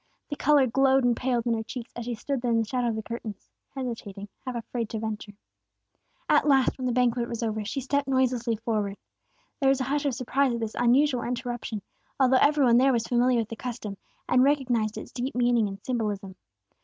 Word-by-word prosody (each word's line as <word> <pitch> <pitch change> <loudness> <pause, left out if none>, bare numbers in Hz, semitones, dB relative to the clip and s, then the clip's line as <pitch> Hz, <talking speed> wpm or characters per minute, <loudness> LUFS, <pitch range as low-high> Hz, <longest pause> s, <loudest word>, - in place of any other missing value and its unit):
The 290 - -3
color 290 -1 +4
glowed 270 +2 +3
and 245 -1 +3
paled 245 -2 -1
in 235 - +2
her 225 - -1
cheeks, 235 +1 -8
as 240 - -5
she 240 -1 -3
stood 270 +3 -3
there 245 - -1
in 230 - +3
the 225 - +1
shadow 250 +2 -1
of 230 - 0
the 220 - -4
curtains, 220 -3 -7 0.2
hesitating, 220 -6 -6 0.2
half 255 - -3
afraid 235 -1 -4
to 225 - -4
venture. 215 -1 -5 0.9
At - - +4
last, 270 -3 +4
when 255 - -1
the - - +1
banquet 240 -1 +1
was 235 0 -4
almost 220 -1 0
over, 210 - -4
she 270 - -3
stepped 280 +2 0
noiselessly 255 -3 +1
forward. 210 -3 -2 0.6
There 270 - +3
was 270 0 +3
a - - 0
hush 285 +3 -1
of 265 - -1
surprise 260 +1 +1
at - - -3
this 225 -1 -3
unusual 250 +2 +3
interruption, 240 -4 -4 0.4
although 260 -1 +5
every 290 -1 +4
one 235 -1 +5
there 265 +2 +5
was 235 -3 0
familiar 245 0 +2
with 225 -2 -1
the 225 - -5
custom, 225 -4 -5 0.3
and 250 - +4
recognized 250 -6 +1
its - - -8
deep 250 +1 -4
meaning 240 -3 +3
and 195 0 -7
symbolism. 210 -6 -3
240 Hz, 215 wpm, -27 LUFS, 225-260 Hz, 0.9 s, although